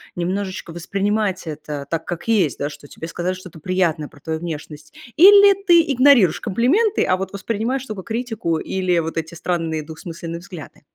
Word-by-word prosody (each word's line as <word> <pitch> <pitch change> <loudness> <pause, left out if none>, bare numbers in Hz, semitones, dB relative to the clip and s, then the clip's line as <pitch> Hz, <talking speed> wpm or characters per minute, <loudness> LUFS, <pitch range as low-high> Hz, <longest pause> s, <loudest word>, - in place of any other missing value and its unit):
немножечко 185 +1 -3
воспринимать 195 +2 -1
это 150 -2 -6
так, 165 -1 -2
как 175 +3 -6
есть, 200 - +2
да, 145 - -1
что 150 -1 -12
тебе 160 - -8
сказали 175 +2 -2
что-то 185 -3 -11
приятное 170 -3 0
про 145 - -18
твою 160 +2 -4
внешность 155 -2 -7 0.2
или 400 +3 +8
ты 345 -3 +6
игнорируешь 255 - +5
комплименты, 290 - +2
а 185 - +2
вот 190 0 -5
воспринимаешь 230 +6 -2
только 215 -5 -6
критику 225 -7 -2
или 185 +1 -1
вот 165 0 -4
эти 165 +1 -3
странные, 165 -2 -2
двусмысленные 165 +1 -7
взгляды? 170 -3 -11
180 Hz, 165 wpm, -21 LUFS, 160-215 Hz, 0.2 s, или